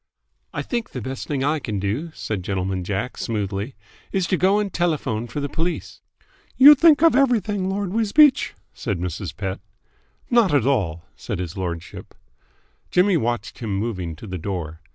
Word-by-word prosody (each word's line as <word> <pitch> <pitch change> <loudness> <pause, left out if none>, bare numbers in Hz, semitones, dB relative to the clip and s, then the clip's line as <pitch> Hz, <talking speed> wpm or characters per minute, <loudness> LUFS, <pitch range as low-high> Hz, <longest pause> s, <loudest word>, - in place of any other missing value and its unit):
"I - - -3
think 235 -3 -3
the 125 - -4
best 130 +2 -5
thing 140 -3 -1
I 150 +2 +1
can 110 -6 -4
do," 110 - -2
said 105 -4 -3
Gentleman 95 0 -2
Jack 100 +6 -3
smoothly, 105 +2 -3 0.4
"is 190 -2 +1
to 185 - +1
go 190 +3 +3
and 205 -3 -1
telephone 140 -10 -1
for 145 - -5
the 145 - -2
police." 165 +5 -3 0.6
"You 285 +3 +11
think 305 +1 +5
of 330 -6 +6
everything, 215 -8 +2
Lord 195 -1 -2
Wisbeach," 260 +6 +4 0.2
said 100 -5 -3
Mrs. 90 +1 -5
Pett. 95 -3 -3 0.7
"Not 225 -10 +4
at 130 -5 +3
all," 95 - 0
said - - -5
his 85 -2 -5
lordship. 85 -3 -6 0.7
Jimmy 185 +1 +3
watched 120 -7 -2
him 110 -4 -3
moving 95 -6 -3
to 80 - -11
the 95 -3 -5
door. 80 -3 -5
125 Hz, 170 wpm, -22 LUFS, -, 0.7 s, You